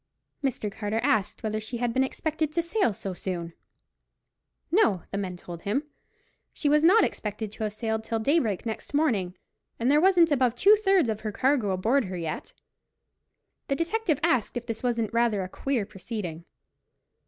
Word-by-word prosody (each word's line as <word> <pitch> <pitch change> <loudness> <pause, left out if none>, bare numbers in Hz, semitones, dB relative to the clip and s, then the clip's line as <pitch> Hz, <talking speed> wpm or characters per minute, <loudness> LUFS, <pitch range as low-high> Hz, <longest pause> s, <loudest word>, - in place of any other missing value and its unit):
Mr. 235 -6 -1
Carter 210 +2 -2
asked 220 -8 +1
whether 215 0 -1
she 225 +3 -4
had 240 -1 -1
been 260 - +3
expected 310 +3 -2
to 335 +2 0
sail 340 - +1
so 195 -1 -5
soon. 175 -2 -5 1.2
No, 220 - +3
the 200 - -2
men 185 -3 -4
told 175 -1 -9
him; 230 +9 -1 0.7
she 295 - -2
was 300 +1 +4
not 395 +6 +6
expected 210 - -3
to 220 - -6
have 210 - -3
sailed 220 0 -2
till 225 0 -2
daybreak 225 - +1
next 225 +5 -5
morning, 210 - +1 0.4
and 240 +4 +2
there 300 +1 +5
wasn't 350 -3 +5
above 255 -4 +2
two 405 - +6
thirds 390 - +3
of 215 -1 -2
her 215 - -3
cargo 260 -2 +1
aboard 220 +8 +2
her 185 -1 -5
yet. 165 - -5 1.2
The 275 - +1
detective 335 -1 0
asked 245 0 +1
if 240 - -5
this 230 -2 -5
wasn't 235 -3 -1
rather 230 -4 +2
a - - -4
queer 245 +3 -2
proceeding. 185 -4 -6
230 Hz, 175 wpm, -27 LUFS, 205-290 Hz, 1.2 s, not